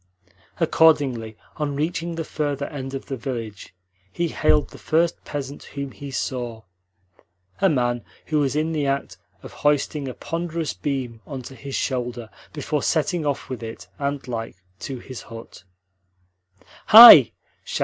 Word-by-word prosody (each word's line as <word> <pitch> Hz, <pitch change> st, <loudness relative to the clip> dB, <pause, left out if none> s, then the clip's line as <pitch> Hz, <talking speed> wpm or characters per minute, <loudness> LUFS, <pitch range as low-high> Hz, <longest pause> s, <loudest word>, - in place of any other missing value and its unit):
Accordingly, 130 Hz, -9 st, +2 dB, 0.2 s
on 145 Hz, -2 st, -2 dB
reaching 165 Hz, +3 st, -2 dB
the 165 Hz, -, -3 dB
further 145 Hz, -2 st, -3 dB
end 135 Hz, -2 st, -6 dB
of 135 Hz, -, -6 dB
the 135 Hz, -, -4 dB
village, 115 Hz, -7 st, -7 dB, 0.4 s
he 170 Hz, -1 st, -2 dB
hailed 150 Hz, -1 st, +1 dB
the -, -, -13 dB
first 165 Hz, +2 st, 0 dB
peasant 140 Hz, -1 st, -6 dB
whom 140 Hz, -1 st, -6 dB
he 140 Hz, +2 st, -9 dB
saw 120 Hz, -3 st, -4 dB, 1.0 s
a 195 Hz, -, +4 dB
man 120 Hz, -5 st, 0 dB, 0.2 s
who 155 Hz, -1 st, 0 dB
was 140 Hz, -1 st, 0 dB
in 155 Hz, +2 st, 0 dB
the 150 Hz, -3 st, -1 dB
act 140 Hz, 0 st, -2 dB, 0.3 s
of -, -, -10 dB
hoisting 145 Hz, -1 st, 0 dB
a 125 Hz, -, -6 dB
ponderous 165 Hz, -1 st, -4 dB
beam 130 Hz, -5 st, -4 dB
on 135 Hz, -4 st, -6 dB
to 130 Hz, -, -10 dB
his 135 Hz, +2 st, -7 dB
shoulder 120 Hz, -4 st, -3 dB, 0.2 s
before 150 Hz, -1 st, -3 dB
setting 160 Hz, 0 st, 0 dB
off 140 Hz, -, -2 dB
with 130 Hz, -2 st, -6 dB
it, 110 Hz, -5 st, -8 dB
ant 140 Hz, -1 st, -3 dB
like, 115 Hz, -2 st, -5 dB, 0.2 s
to 135 Hz, -, -6 dB
his 130 Hz, 0 st, -9 dB
hut. 115 Hz, -3 st, -12 dB, 1.2 s
"Hi!" 220 Hz, -, +11 dB
140 Hz, 150 wpm, -23 LUFS, 125-155 Hz, 1.2 s, Hi